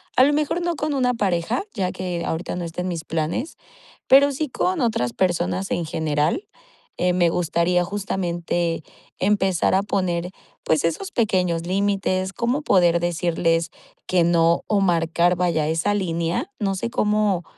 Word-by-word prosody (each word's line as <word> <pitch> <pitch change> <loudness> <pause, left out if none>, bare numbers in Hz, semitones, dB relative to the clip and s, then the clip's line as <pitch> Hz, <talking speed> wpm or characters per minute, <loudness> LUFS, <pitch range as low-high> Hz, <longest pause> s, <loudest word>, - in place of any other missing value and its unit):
a 255 - +6
lo 290 - +4
mejor 305 +4 0
no 345 0 -1
con 300 0 -2
una 250 -2 +1
pareja, 200 - 0
ya 185 -3 -1
que 180 -2 -4
ahorita 160 +3 -3
no 180 - -4
estén 180 +2 -4
mis 170 -3 -3
planes, 165 - -3 0.5
pero 280 +2 +6
sí 295 +2 -2
con 360 +5 -1
otras 200 - 0
personas 185 +1 -1
en 175 - -1
general, 160 - -1 0.5
eh, 180 0 +1
me 175 -1 +3
gustaría 175 +1 +1
justamente 175 -3 -2 0.4
empezar 190 -3 +2
a 190 - +3
poner, 180 -3 -1 0.3
pues, 155 -1 +1
esos 375 - -1
pequeños 180 -7 0
límites 190 0 0
cómo 245 +7 -1
poder 175 - +3
decirles 165 -1 0 0.4
que 180 -2 +2
no 170 0 +3
o 205 -2 +1
marcar 170 -1 +2
vaya 165 -4 +1
esa 165 +6 0
línea. 170 +1 -1
No 195 -3 0
sé 190 - -3
¿cómo 210 -5 +1
180 Hz, 155 wpm, -22 LUFS, 170-205 Hz, 0.5 s, a